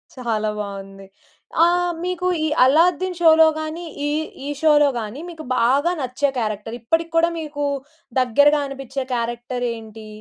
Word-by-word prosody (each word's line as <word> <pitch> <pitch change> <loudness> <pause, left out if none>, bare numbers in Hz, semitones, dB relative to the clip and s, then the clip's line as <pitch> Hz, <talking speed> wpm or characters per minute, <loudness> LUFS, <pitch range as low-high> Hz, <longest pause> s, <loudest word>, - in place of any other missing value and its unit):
చాలా 220 -4 -1
బావుంది. 195 -1 -7 0.6
ఆహ్, 350 +1 +2
మీకు 360 0 -2 0.2
ఈ - - +1 0.2
అల్లాద్దీన్ 345 +6 +3
షో‌లో 320 -1 +7
గానీ 315 +2 -5 0.2
ఈ, - - 0 0.4
ఈ - - -3
షో‌లో 295 -2 +5
గానీ 220 +5 -6
మీకు 320 -2 -9
బాగా 275 +8 +3
నచ్చే 260 +3 0
క్యారెక్టర్ 215 0 -3
ఇప్పటికి 330 +7 0
కూడా 335 +1 +4
మీకు 295 -2 -4 0.6
దగ్గరగా 285 +5 +4
అనిపించే 270 -1 -5
క్యారెక్టరేంటి? 235 -2 -4
275 Hz, 130 wpm, -21 LUFS, 230-320 Hz, 0.6 s, షో‌లో